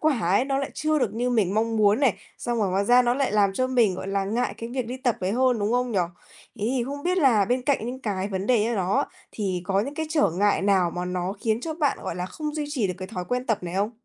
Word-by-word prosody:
quả 305 -5 +2
ấy 195 +6 +2
nó 270 0 0
lại 275 - -3
chưa 310 0 +1
được 235 -7 -1
như 245 +2 0
mình 205 -6 +1
mong 225 +1 +1
muốn 210 +2 +4
này, 265 -7 +3 0.2
xong 240 -1 -2
rồi 205 -3 +1
ngoài 195 +2 +1
ra 245 +4 +6
nó 240 0 +2
lại 270 -4 0
làm 205 -2 +3
cho 255 +6 0
mình, 240 -7 +3
gọi 190 +1 -6
là, 195 0 0
ngại 230 +5 -1
cái 230 - -5
việc 250 -1 -3
đi 250 +2 -5
tập 255 -4 0
ấy 185 +1 -1
hơn, 250 0 +2
đúng 205 +2 0
không 250 0 +1
nhỉ? 200 - +1 0.6
Thế 205 - -2
thì 240 - 0
không 285 +3 -6
biết 365 +3 +1
là 245 - +4
bên 250 +4 0
cạnh 260 -4 0
những 255 +2 -5
cái 200 -5 -2
vấn 190 0 -3
đề 240 -3 +3
như 230 +2 0
đó 190 -1 +1 0.3
thì 190 -4 -2
có 195 +1 +2
những 275 +7 -4
cái 315 +1 -3
trở 300 - +2
ngại 200 +4 +1
nào 190 -3 +3
mà 175 +1 -4
nó 180 +1 -2
khiến 220 0 0
cho 320 +3 -4
bạn, 300 -3 0
gọi - - -4
là, 180 0 -3
không 300 +8 -5
duy 305 -1 -2
trì 265 -8 0
được 180 - -3
cái 185 0 -6
thói 180 -2 -5
quen 250 +6 -2
tập 220 -3 +1
này 175 0 -5
không? 200 +3 0
225 Hz, 295 wpm, -25 LUFS, 195-255 Hz, 0.6 s, ra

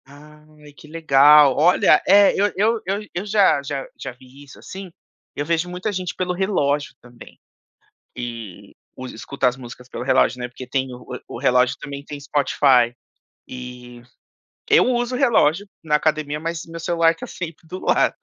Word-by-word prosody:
Ai, 150 +1 -17
que 150 - -16
legal. 150 -2 +5
Olha, 175 +5 +4
eh, 200 0 +6
eu 205 +1 +1
eu 220 +3 +1
eu 200 +3 -2
eu 175 +4 -4
já 200 -8 +3
já 140 -1 -4
já - - -6
vi 130 +3 -17
isso, 140 - -15
assim, 190 -1 -10 0.4
eu 145 - -3
vejo 170 +2 -1
muita 180 +4 -4
gente 185 -2 -4
pelo 180 -1 -2
relógio 150 - -1
também. 120 -1 -16 0.8
Que 115 -6 -8 0.2
usa 130 0 -8
escuta 130 +3 -1
as 125 - -4
músicas 125 -1 -12
pelo 120 - -7
relógio, 130 -1 +2
né, 125 - -4
porque 125 +1 -10
tem 130 0 -2
o 125 - -12 0.3
o - - -8
o - - -6
relógio 125 0 +2
também 140 0 -8
tem 145 0 -8
Spotify, 135 -4 +2 0.5
e 125 -1 -10 0.7
eu 435 - +5
uso 245 0 0
relógio 205 - +2 0.2
na 150 -2 +1
academia, 150 -1 -1
mas 165 0 -4
meu 165 0 -9
celular 165 0 +2
tá 165 - -8
sempre 165 -2 -8
do 185 +3 -7
lado. - - +1
150 Hz, 170 wpm, -21 LUFS, 130-175 Hz, 0.8 s, eh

